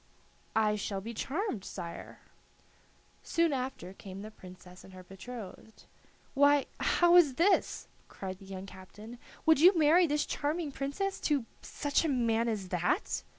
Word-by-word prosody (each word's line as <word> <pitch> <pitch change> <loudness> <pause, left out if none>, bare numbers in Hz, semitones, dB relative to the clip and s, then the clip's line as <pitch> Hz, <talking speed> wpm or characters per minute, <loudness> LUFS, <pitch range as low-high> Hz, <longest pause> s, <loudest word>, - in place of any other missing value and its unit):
"I 210 -1 +2
shall 200 -1 -3
be 225 +4 -7
charmed, 270 - -3
sire." 170 -4 -8 1.0
Soon 335 -2 +1
after 255 -8 -4
came 195 0 -9
the 215 - -9
Princess 180 -2 -14
and 190 - -14
her 185 0 -11
betrothed. 215 +2 -10 0.5
"Why, 285 0 +4
how 345 0 +4
is 295 -7 +5
this?" 360 +7 +2 0.2
cried 190 -1 -7
the 195 - -13
young 190 0 -7
captain; 205 +5 -12 0.3
"would 320 -3 +5
you 360 +3 +7
marry 325 +3 +5
this 295 0 0
charming 300 +1 -2
princess 285 +9 -3
to 285 -6 0 0.2
such 290 +1 -1
a 325 - 0
man 230 -3 +1
as 205 -5 -3
that?" 180 - -1
235 Hz, 150 wpm, -31 LUFS, 195-295 Hz, 1.0 s, you